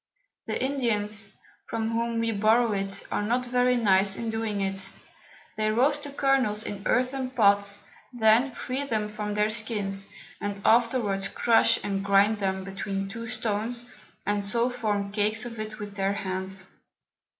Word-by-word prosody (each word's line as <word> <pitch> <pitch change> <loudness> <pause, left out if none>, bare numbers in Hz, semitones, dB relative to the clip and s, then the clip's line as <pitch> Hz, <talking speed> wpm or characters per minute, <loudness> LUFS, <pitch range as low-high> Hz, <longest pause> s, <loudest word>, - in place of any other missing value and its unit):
The - - -1
Indians, 220 -6 0 0.4
from 225 0 -2
whom 230 0 -1
we 230 0 0
borrow 220 +3 +3
it, 195 -1 -3
are - - 0
not 240 +4 0
very 250 0 +2
nice 195 -3 +3
in 230 +1 -3
doing 220 -2 -2
it; 195 0 -1 0.7
they 215 0 +1
roast 285 +6 +2
the - - -5
Kernels 270 -7 +2
in 200 -1 -5
earthen 255 +1 +1
Pots, 200 -4 +2 0.3
then 235 +2 +4
free 260 +3 -3
them 220 -6 -1
from 210 -1 -4
their 210 +1 +2
Skins, 205 -3 0 0.3
and 205 -1 -3
afterwards 225 -4 +3
crush 230 +2 +4
and 195 -1 -2
grind 200 +2 +3
them 190 -1 -1
between 195 0 -4
two 230 +2 -6
Stones, 230 +1 -3 0.4
and 205 0 0
so 235 +5 +1
form 205 -4 -2
Cakes 215 +3 +1
of 230 -2 -7
it 215 0 -5
with 205 -2 -7
their 195 0 +1
Hands. 190 -1 -3
215 Hz, 155 wpm, -27 LUFS, 200-235 Hz, 0.7 s, then